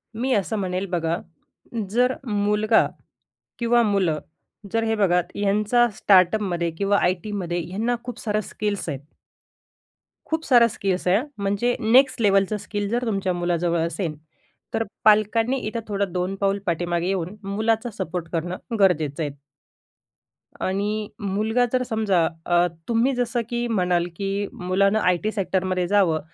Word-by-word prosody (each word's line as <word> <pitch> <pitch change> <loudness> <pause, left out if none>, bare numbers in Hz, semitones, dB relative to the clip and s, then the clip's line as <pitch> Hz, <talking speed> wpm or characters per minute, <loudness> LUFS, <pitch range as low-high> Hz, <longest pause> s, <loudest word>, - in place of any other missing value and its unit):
मी 255 +4 -1
असं 210 +1 0
म्हणेल 185 -1 -2
बघा, 170 -2 0 0.7
जर 250 +4 +2
मुलगा 210 -1 +2 0.7
किंवा 235 0 +3
मुलं 180 -6 +1 0.5
जर 225 - +1
हे 225 0 +1
बघा 180 -4 +3
ह्यांचा 210 +4 +2
स्टार्टअपमधे 185 -2 +3
किंवा 200 0 +2
आय. 180 - +3
टी.मधे 190 -5 -3
ह्यांना 225 +6 -1
खूप 245 -1 -6
सारं 215 -1 0
स्किल्स 210 -3 -3
आहेत. 140 -4 -3 1.3
खूप 320 0 -2
साऱ्या 240 -3 +6
स्किल्स 190 -3 -2
आहे 190 +5 +4 0.2
म्हणजे 205 +5 0
नेक्स्ट 250 +2 +4
लेवलचं 195 0 +3
स्किल 205 0 -4
जर 240 +3 -1
तुमच्या 195 -4 0
मुलाजवळ 175 -1 0
असेल 170 -3 -3 0.6
तर 225 - +1 0.2
पालकांनी 220 +4 +4
इथं 230 +2 -3
थोडं 200 -2 -1
2 180 +1 -1
पाऊल 195 0 0
पाठीमागे 175 0 -1
येऊन 185 0 -2
मुलाचा 220 +4 0
सपोर्ट 180 -2 -3
करणं 175 +2 -2 0.2
गरजेचं 160 -6 +2
आहे. 145 - -2 1.3
आणि 205 +2 -1
मुलगा 215 +4 +1
जर 255 0 +2
समजा 215 -8 +1 0.2
अ, 175 0 +3 0.2
तुम्ही 235 +3 +2
जसं 240 -1 0
की 240 0 -1
म्हणाल 180 -6 +1
की, 200 +2 -2
"मुलानं 195 +3 +1
आय. 180 -4 +3
टी. 215 - 0
सेक्टरमध्ये 185 -2 -1
जावं." 190 -5 +3
200 Hz, 140 wpm, -23 LUFS, 180-220 Hz, 1.3 s, साऱ्या